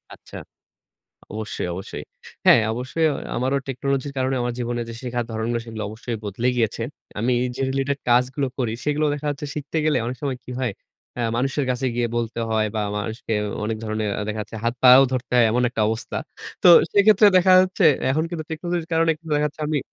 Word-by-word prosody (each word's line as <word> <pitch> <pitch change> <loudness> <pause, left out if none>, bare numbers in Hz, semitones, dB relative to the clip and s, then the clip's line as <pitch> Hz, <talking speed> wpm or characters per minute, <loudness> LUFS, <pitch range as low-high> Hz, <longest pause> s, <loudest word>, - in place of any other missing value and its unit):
আচ্ছা। - - -12 1.0
অবশ্যই, 110 -4 -4
অবশ্যই। 95 +2 -7 0.4
হ্যাঁ, - - +7
অবশ্যই 130 +7 -1 0.3
আমারও 130 +3 0
টেকনোলজির 140 +1 -2
কারণে 130 +1 0
আমার 120 0 -2
জীবনে 120 0 -2
যে - - -6
শেখার 120 -1 -3
ধরণগুলো, 115 +1 -2
সেগুলো 110 -2 -6
অবশ্যই 115 +1 -5
বদলে 105 +5 -2
গিয়েছে। 115 -1 0 0.4
আমি 125 +3 +1 0.2
যে - - -4
related 135 +1 -1
task 125 +1 +4
গুলো 140 -2 0
করি, 120 -4 0
সেগুলো 150 +1 +1
দেখা 150 +1 -4
যাচ্ছে 145 +1 -4
শিখতে 150 +2 -4
গেলে 155 - +3
অনেক 125 +2 -3
সময় 135 -3 -2
কি 125 - -9
হয় 125 -5 -1 0.4
হ্যাঁ, 115 -1 0
মানুষের 135 +2 0
কাছে 125 +1 -2
গিয়ে 120 -1 +1
বলতে 115 0 -3
হয় 110 -1 +1
বা, 110 - 0 0.2
মানুষকে 110 +2 -4
অ 105 - -3
অনেক 110 +1 -2
ধরনের 110 -1 -2
আ - - -2
দেখা 110 0 -3
যাচ্ছে 105 - -9
হাত 115 0 +1
পাও 130 +1 +9
ধরতে 130 -1 -3
হয়। 120 - +6
এমন 125 +2 +1
একটা 115 - -2
অবস্থা। 110 +1 -3 0.5
তো - - +7 0.2
সেক্ষেত্রে 205 +1 +6
দেখা 185 +1 +5
যাচ্ছে 185 0 +2 0.3
এখন 155 +3 +1
কিন্তু 165 -3 -4
টেকনোলজির 170 +1 -3
কারণে 165 0 +3
একটু 165 +1 -27
দেখা 150 0 +1
যাচ্ছে 150 +1 -11
আমি 150 -2 +1
125 Hz, 195 wpm, -23 LUFS, 115-145 Hz, 1.0 s, পাও